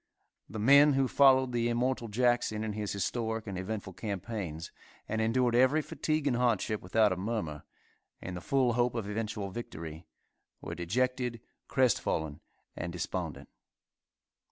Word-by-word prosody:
The - - -6
men 140 +6 +6
who 135 -1 +2
followed 130 -1 +5
the 120 -1 +1
immortal 120 0 0
Jackson 120 -1 +1
in 110 -1 -3
his 105 -1 -3
historic 110 +2 -2
and 100 -3 -5
eventful 95 +1 -4
campaigns, 95 -5 -5 0.4
and 110 +1 -1
endured 120 +2 +2
every 130 +6 +4
fatigue 155 0 -1
and 135 -4 +2
hardship 115 -3 +1
without 105 +3 +3
a - - +1
murmur, 90 -6 -3 0.5
in 90 - -6
the 90 - -6
full 130 +2 +2
hope 120 0 +1
of 110 -4 -3
eventual 105 -2 -3
victory, 80 -7 -7 0.5
were - - -6
dejected, 120 +7 -1 0.3
crestfallen 80 - +1 0.4
and 85 - -4
despondent. 85 -1 -4
110 Hz, 140 wpm, -31 LUFS, 95-125 Hz, 0.5 s, men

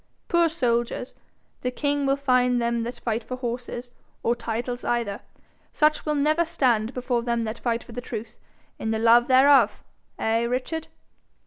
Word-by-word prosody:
Poor 340 -1 +3
soldiers 245 -5 -1 0.5
the 250 - -1
king 285 +2 -1
will 275 - +3
find 250 -3 +2
them 235 0 0
that 240 +2 -5
fight 230 0 -2
for 255 - -6
horses, 245 0 -5 0.3
or 235 - +3
titles 240 +1 -4
either. 235 -4 -1 0.5
Such 305 0 +2
will 300 - +1
never 305 +4 +2
stand 255 -8 +1
before 250 -1 0
them 235 -1 -1
that 220 +1 -4
fight 235 -1 -1
for - - -14
the 245 +2 -5
truth 230 -2 -7 0.4
in 220 - -2
the 220 - 0
love 235 +2 +5
thereof! 260 -4 +5 0.3
Eh, 225 +1 +1
Richard?' 255 +7 -2
245 Hz, 160 wpm, -25 LUFS, 235-275 Hz, 0.5 s, love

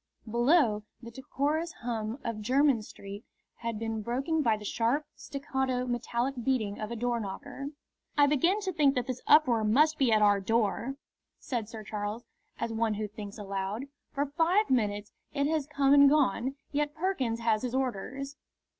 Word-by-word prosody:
Below, 240 -1 +3 0.2
the 235 - -8
decorous 290 +6 -2
hum 225 -1 -3
of 230 -2 -3
Jermyn 260 +1 +3
Street 200 0 -9 0.3
had 230 -2 -3
been 225 0 -3
broken 270 +8 0
by 225 -6 +2
the 210 - -10
sharp, 240 +8 0
staccato, 265 -2 -2
metallic 240 +1 -1
beating 220 -6 0
of 215 - -4
a 235 - -4
doorknocker. 235 +3 -3 0.5
"I 290 - +7
begin 335 +9 +2
to 380 -2 -2
think 290 -4 +3
that 250 -2 0
this 255 -1 -4
uproar 250 -8 +5
must 300 +9 +3
be 260 -4 +3
at 215 -1 +5
our 205 -1 +5
door," 225 +5 0 0.4
said 230 -5 -4
Sir 220 -2 -8
Charles, 210 +2 -4 0.3
as 230 - -2
one 225 -1 +1
who 210 0 -2
thinks 205 -1 -8
aloud. 200 +5 -4 0.2
"For 285 0 0
five 335 +8 +2
minutes 205 -4 0 0.2
it 280 0 +2
has 305 -2 0
come 280 -2 +3
and 280 -1 +8
gone; 270 -2 +2 0.2
yet 295 +1 -1
Perkins 290 -10 -1
has 220 -2 +2
his 250 0 -3
orders." 265 +3 -3
245 Hz, 165 wpm, -30 LUFS, 220-280 Hz, 0.5 s, and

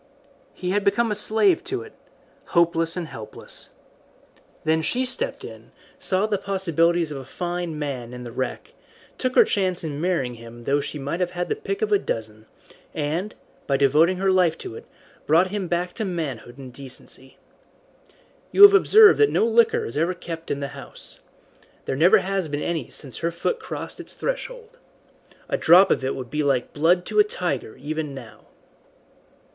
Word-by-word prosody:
He 180 0 -3
had 205 +1 +1
become 230 +3 +2
a - - +2
slave 220 - +2
to 395 +1 -3
it 440 - -14 0.6
hopeless 165 0 +2
and 175 - -2
helpless. 110 -8 -7 0.9
Then 160 0 +2
she 250 +10 0
stepped - - -1
in, - - -11 0.3
saw 190 +2 +1
the 210 -2 -1
possibilities 170 -4 +1
of 140 - -5
a - - -8
fine 175 +3 -4
man 135 -5 -4
in 125 0 -8
the 120 - -8
wreck, 130 +2 -4 0.5
took 255 -1 -1
her - - +8
chance 185 -3 -1
in 150 -2 -4
marrying 170 -9 0
him 115 0 -12
though 140 +4 +1
she 150 - -6
might 145 +5 -4
have 180 -1 0
had 175 - -2
the - - 0
pick 415 0 -4
of 430 - -1
a 410 - +4
dozen, 110 - -5 0.5
and, 160 +7 -2 0.3
by 135 - +2
devoting 155 +7 +4
her 190 +1 +2
life 180 -3 +3
to - - -8
it, - - -11 0.4
brought 170 +5 +4
him 205 -3 -3
back 175 +1 -1
to 220 - -3
manhood 145 - -4
and 130 -2 -10
decency. 130 0 -9 1.1
You 400 - +7
have 405 0 +11
observed 420 +2 +7
that 430 - +5
no - - +2
liquor 230 0 +3
is 115 - -5
ever 175 +3 0
kept 165 -1 -8
in 140 - -2
the 140 - -3
house. - - -8 0.7
There - - -2
never 165 +7 +6
has 195 -2 -1
been 145 0 -3
any 165 -7 -3
since 135 -4 -7
her 170 - 0
foot 170 - -2
crossed - - -7
its - - -6
threshold. - - -5 0.7
A - - -1
drop 185 +4 +6
of - - +1
it 130 - -1
would 125 -3 -7
be 150 +1 -1
like 135 -4 0
blood 175 +4 +2
to - - 0
a - - +9
tiger 430 -1 -3
even 155 -2 -4
now." 110 -4 -12
170 Hz, 185 wpm, -23 LUFS, 140-200 Hz, 1.1 s, have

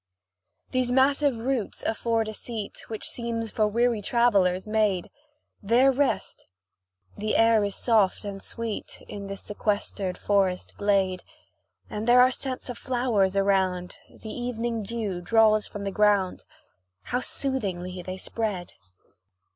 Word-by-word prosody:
These 255 -1 +1
massive 275 0 +3
roots 240 -1 -2
afford 225 0 0
a 215 - -4
seat, 220 -2 -6
Which 220 -1 -4
seems 230 -2 -3
for 215 -1 +2
weary 235 +1 +1
travellers 200 -5 +2
made. 210 -4 +1 0.5
There 240 +6 +4
rest. 275 +1 -1 0.7
The 215 +1 -1
air 225 -1 +5
is 200 -1 -1
soft 215 -5 +2
and 195 -1 -5
sweet 230 -2 -5
In 200 -1 -7
this 195 0 -5
sequestered 205 -2 -2
forest 195 -3 0
glade, 195 -3 +1 0.7
And 210 +2 -5
there 245 +1 +7
are 255 +1 +6
scents 260 0 -3
of 245 -2 -6
flowers 240 -7 +1
around, 190 -2 +1
The 220 - -9
evening 240 -2 -2
dew 205 -4 -3
draws 215 +2 +4
from 205 - -7
the 195 - -2
ground; 205 -2 +2 0.6
How 245 - -1
soothingly 190 -10 -3
they 185 +1 -6
spread! 195 -3 -3
215 Hz, 130 wpm, -26 LUFS, 195-235 Hz, 0.7 s, there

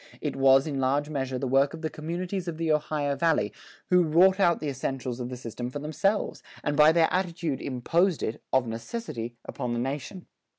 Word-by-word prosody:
It - - -3
was 135 0 +5
in 145 -4 -3
large 140 +3 +1
measure 135 -3 -2
the 135 - -3
work 135 +4 +3
of 160 - -11
the 160 - 0
communities 175 +4 -4
of 165 -2 -4
the 165 -1 0
Ohio 150 -1 0
Valley 145 - +1 0.4
who 180 0 +6
wrought 180 +4 +4
out 175 -3 +4
the 155 - -4
essentials 130 -2 -3
of 125 0 -4
the 125 - -6
system 120 0 -5
for 130 - -6
themselves, 160 +8 -1 0.2
and 145 - 0
by 150 +2 +7
their 165 0 +4
attitude 170 -6 -1
imposed 165 +7 +1
it, 110 - -3
of 130 -1 +3
necessity, 115 - -5
upon 120 -1 -3
the 120 - -1
nation. 145 +8 -4
145 Hz, 200 wpm, -27 LUFS, 130-170 Hz, 0.4 s, by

